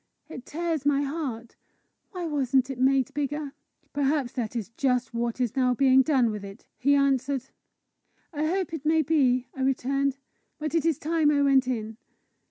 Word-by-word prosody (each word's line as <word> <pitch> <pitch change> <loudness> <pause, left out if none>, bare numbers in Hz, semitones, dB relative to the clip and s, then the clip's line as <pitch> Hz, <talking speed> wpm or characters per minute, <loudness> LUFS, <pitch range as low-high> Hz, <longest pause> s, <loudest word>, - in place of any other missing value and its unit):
It 255 -5 -9
tears 325 -2 -2
my 285 0 +2
heart. 275 -6 -5 0.5
Why 360 -4 -5
wasn't 270 -3 +1
it 255 - -7
made 265 +1 +2
bigger?" 290 0 -3 0.4
"Perhaps 285 -3 0
that 245 -3 -4
is 225 -3 -3
just 250 -1 -1
what 235 +1 -2
is 245 -1 -1
now 250 -2 +2
being 265 0 +5
done 260 -5 +2
with 210 -1 -6
it!" 195 0 -11
he 280 +3 +3
answered. 275 -1 +1 0.8
"I 305 +1 -1
hope 365 0 -1
it 315 -4 -5
may 315 +1 +3
be!" 260 -5 +2
I 265 - -6
returned. 270 +1 0 0.2
" - - -48
But 305 0 -3
it 330 -1 +2
is 320 -5 +1
time 315 -1 +1
I 285 -1 +3
went 270 -2 +4
in." 220 -3 -3
275 Hz, 180 wpm, -26 LUFS, 250-295 Hz, 0.8 s, being